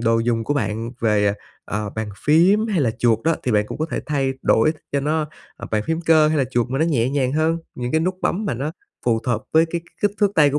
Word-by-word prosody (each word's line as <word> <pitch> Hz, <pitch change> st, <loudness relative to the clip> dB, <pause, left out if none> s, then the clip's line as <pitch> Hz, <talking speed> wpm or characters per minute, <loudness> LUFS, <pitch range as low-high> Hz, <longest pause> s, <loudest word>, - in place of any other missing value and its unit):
đồ 115 Hz, 0 st, +2 dB
dùng 115 Hz, -1 st, 0 dB
của 145 Hz, -, -1 dB
bạn 115 Hz, -3 st, -2 dB
về, 105 Hz, -2 st, +2 dB
ờ, 100 Hz, -, +3 dB, 0.3 s
ờ, 105 Hz, 0 st, -3 dB
bàn 110 Hz, -1 st, -4 dB, 0.2 s
phím 185 Hz, +9 st, +4 dB
hay 195 Hz, -7 st, 0 dB
là 120 Hz, -5 st, +2 dB
chuột 115 Hz, -2 st, +3 dB
đó. 165 Hz, 0 st, +3 dB
Thì 125 Hz, -, 0 dB
bạn 105 Hz, 0 st, +2 dB
cũng -, -, -7 dB
có 155 Hz, -, -1 dB
thể -, -, -2 dB
thay 135 Hz, -3 st, 0 dB
đổi 115 Hz, +8 st, +3 dB, 0.2 s
cho 140 Hz, -, +1 dB
nó, 150 Hz, +2 st, 0 dB, 0.3 s
ờ, -, -, -8 dB
bàn 105 Hz, -1 st, +1 dB
phím 160 Hz, 0 st, -1 dB
cơ 160 Hz, -2 st, +4 dB
hay 155 Hz, -1 st, +1 dB
là 135 Hz, -, +3 dB
chuột 120 Hz, -2 st, 0 dB
mà 135 Hz, -, -1 dB
nó 160 Hz, -, +3 dB
nhẹ 130 Hz, -7 st, +1 dB
nhàng 135 Hz, -2 st, 0 dB
hơn, 160 Hz, +2 st, +1 dB, 0.2 s
những 125 Hz, 0 st, -4 dB
cái 160 Hz, -, +3 dB
nút 185 Hz, +3 st, 0 dB
bấm 205 Hz, +5 st, 0 dB
mà 150 Hz, -, -1 dB
nó 140 Hz, +6 st, -3 dB, 0.3 s
phù 115 Hz, -2 st, +2 dB
hợp 120 Hz, -3 st, -1 dB
với 160 Hz, +1 st, +5 dB
cái 170 Hz, -, -2 dB
k -, -, -27 dB, 0.2 s
kích 205 Hz, -, +3 dB
thước 205 Hz, -1 st, +3 dB
tay 150 Hz, -2 st, +5 dB
của 145 Hz, -, 0 dB
140 Hz, 280 wpm, -21 LUFS, 115-160 Hz, 0.3 s, với